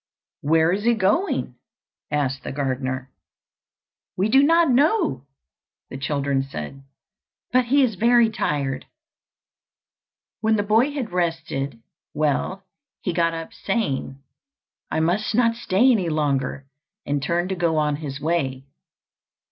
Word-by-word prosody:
"Where 160 +3 +3
is 200 +3 -1
he 235 0 +4
going?" 215 - 0 0.5
asked 135 -2 -1
the - - -5
gardener. 130 -1 -3 1.1
"We 195 +4 +1
do 270 +4 +6
not 330 0 +4
know," 275 - +2 0.6
the - - -5
children 140 -1 0
said; 135 - -7 0.7
"but 255 0 +3
he 275 +3 +4
is 240 -4 +1
very 235 +3 +4
tired." 140 -8 -2 1.5
When 220 0 +2
the 205 - +1
boy 225 +7 +3
had 260 -8 -4
rested 165 -8 -2 0.3
well, 155 +6 0 0.4
he 180 - -1
got 165 0 +1
up 165 0 -7
saying, 140 - -2 0.7
"I 160 - 0
must 190 +7 0
not 230 -1 +3
stay 235 +2 +3
any 190 -8 +1
longer," 140 -3 -1 0.4
and 145 0 -1
turned 175 +5 0
to 190 - -1
go 170 -3 +1
on 150 -1 +1
his 140 -3 -6
way. 140 -5 -1
165 Hz, 130 wpm, -23 LUFS, 140-220 Hz, 1.5 s, do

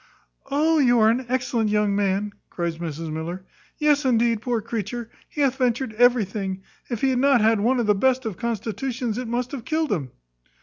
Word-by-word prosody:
"Oh, 310 +3 +2
you 245 -4 +4
are 220 -1 +5
an 245 +1 -2
excellent 245 -3 0
young 210 -1 +1
man," 200 +1 0 0.2
cries 170 -2 -3
Mrs 165 -1 -5
Miller: 170 +4 -5 0.3
"Yes, 300 -1 +3
indeed, 235 -3 +2
poor 240 -1 0
creature! 225 +1 -5 0.2
he 295 - -4
hath 265 -2 +2
ventured 250 -2 0
everything. 210 -5 +1 0.3
If 235 -4 -3
he 270 - +3
had 250 - +1
not 275 -1 +4
had 220 0 +3
one 245 +5 +2
of 235 - +1
the 210 - +4
best 260 +4 +1
of 220 -4 -3
constitutions, 235 +2 -3
it 250 - -4
must 240 +2 -2
have 270 -5 -6
killed 315 +4 -1
him." 150 -10 -1
235 Hz, 190 wpm, -24 LUFS, 205-255 Hz, 0.3 s, are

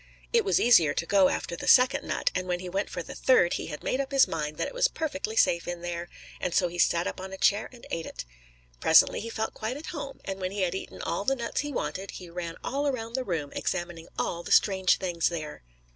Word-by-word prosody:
It 465 -1 +4
was 400 - +2
easier 170 -12 +5
to - - -1
go 195 0 +4
after 170 - -3
the - - -7
second 260 +2 +5
nut, - - 0
and 185 0 -2
when 180 -1 -1
he 180 - -7
went 195 +3 -2
for - - -5
the - - -9
third, 215 -10 +4
he - - -3
had 150 -2 -7
made 265 - 0
up 275 +1 -6
his 275 -1 +5
mind 150 -2 -3
that - - -1
it - - -8
was - - +3
perfectly 285 - -4
safe 170 -6 +3
in 175 0 -5
there, 175 0 -4 0.3
and 175 - -2
so 180 - +4
he 175 +1 -7
sat 170 0 +3
up - - -4
on 190 0 -7
a 190 - -6
chair 205 +3 +2
and 245 -2 -14
ate 165 -1 -3
it. - - -7 0.5
Presently - - +5
he 230 - -5
felt 220 -1 -3
quite 225 +5 -4
at 305 - -9
home, 285 -3 -6
and 195 0 -4
when 185 -1 -2
he 205 - -2
had 180 -2 +1
eaten 190 - -6
all 170 +4 -2
the 270 +6 +2
nuts 235 -2 -2
he 295 0 -4
wanted, 195 -7 -3
he 180 -2 -10
ran 170 -1 -5
all 285 +2 -1
around 230 -4 -3
the 260 +1 -1
room, 165 - -3
examining 170 -1 -3
all 170 - -2
the - - -8
strange 190 -2 +4
things 175 -3 0
there. 155 -3 -6
190 Hz, 255 wpm, -28 LUFS, 170-250 Hz, 0.5 s, easier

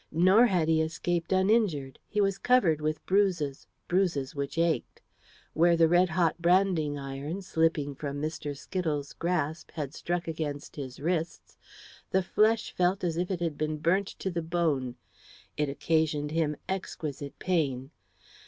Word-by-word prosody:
Nor 185 +9 +5
had 175 -7 +1
he 160 0 +3
escaped 165 +2 -2
uninjured. 190 - +2
He 210 - -2
was 195 -1 +1
covered 185 -12 +3
with 155 0 -2
bruises 180 -8 +1 0.2
bruises 170 -7 0
which 140 +1 -4
ached. 165 -1 0 0.5
Where 170 +1 +4
the 165 -1 +5
red 175 +2 +4
hot 170 0 +1
branding 170 -4 +2
iron, 140 +7 -5
slipping 160 -5 +1
from 140 +1 -5
Mr. 150 -2 -4
Skittles' 150 -4 -3
grasp, 165 -2 -2
had 145 -3 -4
struck 175 +2 -3
against 155 -3 -4
his 130 -4 -7
wrists, 165 +2 -2 0.5
the 190 - +2
flesh 215 +4 +2
felt 180 +2 +1
as 170 -2 0
if 175 +1 -1
it 185 -3 -2
had 165 -4 -2
been 155 0 -1
burnt 185 +6 +1
to 190 - -5
the 170 -1 -2
bone; 160 -7 0 0.6
it 150 -1 0
occasioned 150 0 0
him 155 -2 0
exquisite 150 -7 -5
pain. 140 -7 -1
165 Hz, 150 wpm, -29 LUFS, 150-180 Hz, 0.6 s, Nor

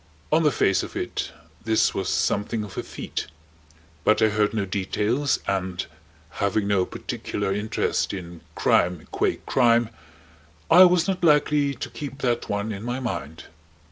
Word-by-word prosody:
On 155 +2 +4
the 150 -2 +3
face 95 -6 +2
of - - -8
it - - -3 0.3
this 110 0 +2
was 95 -1 -2
something 105 +2 0
of 100 -2 -9
a - - -2
feat. - - -5 0.8
But 105 - +4
I 110 - +5
heard 105 0 +1
no 110 -3 -1
details, 105 +8 0
and 95 -2 -1 0.6
having 100 +1 +1
no 95 -3 +2
particular 100 -1 -3
interest 105 +2 -1
in 85 -3 -7
crime 85 -2 +2
qua - - +1
crime 120 -2 +3 0.8
I 180 +3 +10
was 180 -1 +3
not 185 -2 -2
likely 150 -2 +3
to 125 - -6
keep 140 -1 -7
that 120 -2 0
one 105 +2 -1
in 100 -1 -5
my 120 +3 -3
mind. 80 - -5
110 Hz, 155 wpm, -24 LUFS, 100-135 Hz, 0.8 s, I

